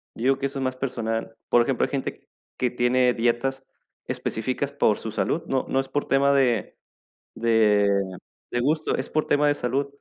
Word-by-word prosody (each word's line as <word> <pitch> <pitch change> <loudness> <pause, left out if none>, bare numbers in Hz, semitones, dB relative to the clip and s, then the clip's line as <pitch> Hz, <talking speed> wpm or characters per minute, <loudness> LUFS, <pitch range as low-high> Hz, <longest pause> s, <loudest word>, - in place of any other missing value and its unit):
yo 115 - -6
digo 135 +1 +3
que 135 - -3
eso 140 0 -3
es - - -2
más 130 0 -1
personal. 115 -4 -3
Por 120 - +5
ejemplo, 130 0 +1
hay - - -6
gente 135 -2 -4 0.3
que 125 - +1
tiene 125 +1 +2
dietas 120 +3 0 0.4
específicas 130 +5 -2
por 110 -7 +2
su 110 - -6
salud, 160 +8 -1
no 135 -1 0
no 135 - +1
es 135 - -2
por 145 - -1
tema 140 +1 +3
de 125 -5 +1 0.6
de 110 -3 +3 0.6
de 120 - 0
gusto, 155 +5 +1
es 130 - -4
por 155 - 0
tema 145 0 +3
de 145 - +4
salud. 135 +2 -1
130 Hz, 190 wpm, -25 LUFS, 120-140 Hz, 0.6 s, Por